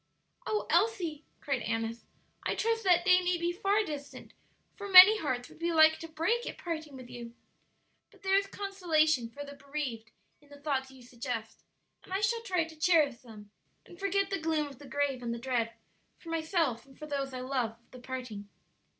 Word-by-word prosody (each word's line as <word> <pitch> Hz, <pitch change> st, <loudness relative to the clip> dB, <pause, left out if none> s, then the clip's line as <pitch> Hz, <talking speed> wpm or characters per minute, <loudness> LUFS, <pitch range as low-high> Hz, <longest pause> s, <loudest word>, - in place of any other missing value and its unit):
"O 425 Hz, -1 st, 0 dB
Elsie," 340 Hz, -4 st, +1 dB, 0.2 s
cried 275 Hz, -4 st, -1 dB
Annis, 225 Hz, +1 st, -3 dB, 0.3 s
"I -, -, -1 dB
trust 455 Hz, 0 st, 0 dB
that 355 Hz, -1 st, +4 dB
day 365 Hz, -1 st, +6 dB
may 360 Hz, 0 st, +1 dB
be 340 Hz, +1 st, -1 dB
far 400 Hz, +3 st, +1 dB
distant, 290 Hz, -6 st, -8 dB, 0.4 s
for 405 Hz, -1 st, -7 dB
many 385 Hz, +3 st, +10 dB
hearts 255 Hz, -6 st, -2 dB
would -, -, -17 dB
be 340 Hz, +1 st, 0 dB
like 315 Hz, -1 st, +6 dB
to 330 Hz, -, -7 dB
break 340 Hz, +10 st, -1 dB
at -, -, -8 dB
parting 315 Hz, -4 st, -5 dB
with 255 Hz, -1 st, -10 dB
you! 240 Hz, -1 st, -9 dB, 0.7 s
But -, -, -23 dB
there 385 Hz, 0 st, +1 dB
is 395 Hz, 0 st, +2 dB
consolation 320 Hz, -, +1 dB
for 285 Hz, +4 st, -8 dB
the 285 Hz, -, -9 dB
bereaved 280 Hz, -6 st, -5 dB, 0.3 s
in 290 Hz, -, -23 dB
the 285 Hz, 0 st, -13 dB
thoughts 275 Hz, -3 st, -1 dB
you 265 Hz, -1 st, -15 dB
suggest; 240 Hz, -2 st, -6 dB, 0.4 s
and -, -, -17 dB
I 380 Hz, -, 0 dB
shall 460 Hz, +2 st, +1 dB
try 365 Hz, -7 st, 0 dB
to 325 Hz, 0 st, -10 dB
cherish 310 Hz, -5 st, +3 dB
them 215 Hz, -4 st, -14 dB, 0.3 s
and 350 Hz, -, -15 dB
forget 395 Hz, 0 st, 0 dB
the 390 Hz, -, -1 dB
gloom 315 Hz, -2 st, +1 dB
of 275 Hz, -3 st, -11 dB
the 290 Hz, -, -12 dB
grave 280 Hz, -2 st, -1 dB
and 235 Hz, -1 st, -3 dB
the -, -, -5 dB
dread, 235 Hz, -2 st, -1 dB, 0.5 s
for 335 Hz, -, -12 dB
myself 320 Hz, -, -1 dB
and 270 Hz, -, -18 dB
for 305 Hz, -, -8 dB
those 280 Hz, -2 st, -3 dB
I 255 Hz, -1 st, -5 dB
love, 255 Hz, -3 st, -1 dB
of 235 Hz, -, -35 dB
the 255 Hz, -, -11 dB
parting." 245 Hz, -5 st, -7 dB
300 Hz, 200 wpm, -31 LUFS, 255-360 Hz, 0.7 s, many